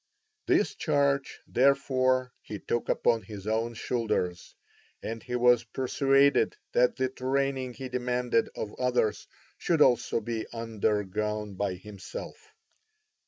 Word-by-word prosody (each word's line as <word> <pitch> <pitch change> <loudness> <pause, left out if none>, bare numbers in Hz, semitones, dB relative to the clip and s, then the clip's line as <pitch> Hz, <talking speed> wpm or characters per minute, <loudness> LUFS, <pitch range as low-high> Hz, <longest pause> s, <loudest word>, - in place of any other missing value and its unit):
This - - +3
charge, 140 -2 0
therefore, 130 -1 +2
he 105 - -7
took 120 +4 -2
upon 115 -2 +2
his 100 -1 -9
own 115 +2 -1
shoulders, 105 -7 -2 0.5
and 115 0 -4
he 125 -1 -4
was 120 -1 +4
persuaded 135 +2 +2
that 125 0 +3
the 130 - 0
training 130 0 -1
he 135 - -6
demanded 125 -2 0
of 105 - -5
others 125 -4 0 0.3
should 165 -3 +1
also 125 -4 +4
be 115 0 -4
undergone 105 -2 -2
by 95 -1 -2
himself. 105 - -9
125 Hz, 120 wpm, -28 LUFS, 110-130 Hz, 0.5 s, was